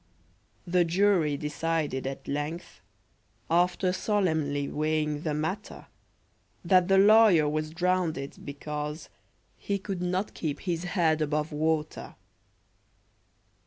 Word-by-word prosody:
The 180 0 +3
jury 170 -4 +2
decided 150 -2 -2
at 135 - -7
length, 150 +4 -5 0.7
After 180 +2 +2
solemnly 160 -9 0
weighing 150 -1 -1
the 155 -2 -2
matter, 160 +8 -4 0.8
That 180 0 +4
the 195 0 +4
lawyer 205 -6 +6
was 155 +1 -2
drownded, 170 -4 -1
because 150 +2 -6 0.5
He 200 - -2
could 195 -2 -5
not 180 +3 -1
keep 150 -4 -4
his 175 -2 -2
head 165 -4 +1
above 150 +1 -1
water! 155 0 -2
160 Hz, 105 wpm, -28 LUFS, 150-180 Hz, 0.8 s, lawyer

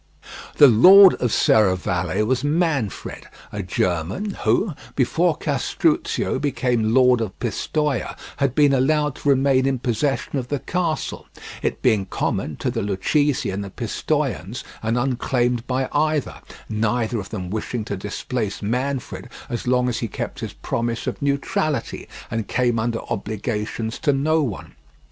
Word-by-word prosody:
The 145 - +9
lord 185 - +9
of 125 - +1
Serravalle 95 -2 +2
was 130 +3 0
Manfred, 145 - -1 0.2
a 105 - -4
German, 90 - -1
who, 200 -5 +2 0.2
before 160 +6 +2
Castruccio 140 -2 0
became 125 -6 0
lord 125 -2 +5
of 105 -4 -4
Pistoia, 135 +4 -2 0.2
had 140 -3 0
been 145 -2 +5
allowed 150 +2 +2
to 145 - -1
remain 135 -1 +3
in 135 -1 +1
possession 135 +3 -1
of 125 - -5
the 145 - -1
castle, 170 +3 -3 0.3
it - - -2
being 105 -6 +2
common - - -2
to - - -2
the - - -2
Lucchese 125 +9 0
and 100 +2 -3
the 100 - -7
Pistoians, - - -2 0.2
and 115 +2 0
unclaimed 125 -1 0
by 130 0 0
either—neither 120 -6 -1
of 95 - -7
them 95 -4 -5
wishing 110 +1 -3
to 100 - -3
displace 105 +2 -4
Manfred 125 +5 -3 0.2
as 120 +1 -4
long 125 0 +2
as 125 -1 -1
he 115 - -2
kept - - -5
his - - -5
promise 115 0 -3
of - - -4
neutrality, 145 +3 -1 0.2
and 115 -3 -2
came 120 -2 +1
under 115 0 -1
obligations 110 +2 -3
to 150 - +2
no 155 +4 +2
one. 120 -9 -4
125 Hz, 145 wpm, -22 LUFS, 110-140 Hz, 0.3 s, The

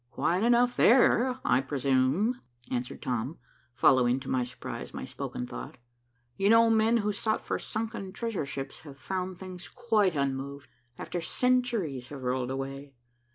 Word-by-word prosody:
"Quiet 180 +8 0
enough 240 +1 +4
there, 255 +1 +4
I - - +4
presume," 135 - +1 0.3
answered 125 0 -3
Tom, 125 +4 -2 0.4
following, 125 +1 +4
to 130 - -7
my 130 -1 +2
surprise, 125 +1 -7
my - - -5
spoken 60 - -5
thought. - - -8 0.6
"You 195 +1 +2
know 230 0 +6
men 225 +1 +4
who 210 - +2
sought 215 +2 0
for - - -2
sunken 220 -3 -4
treasure 205 -7 -3
ships 135 -1 -5
have 140 -3 -12
found 185 +5 -4
things 185 -1 -9
quite 220 -8 +1
unmoved, 140 0 -3 0.3
after 175 - -4
centuries 230 - 0
have 140 -1 -8
rolled 125 0 -1
away. 135 +1 -5
165 Hz, 150 wpm, -29 LUFS, 130-225 Hz, 0.6 s, know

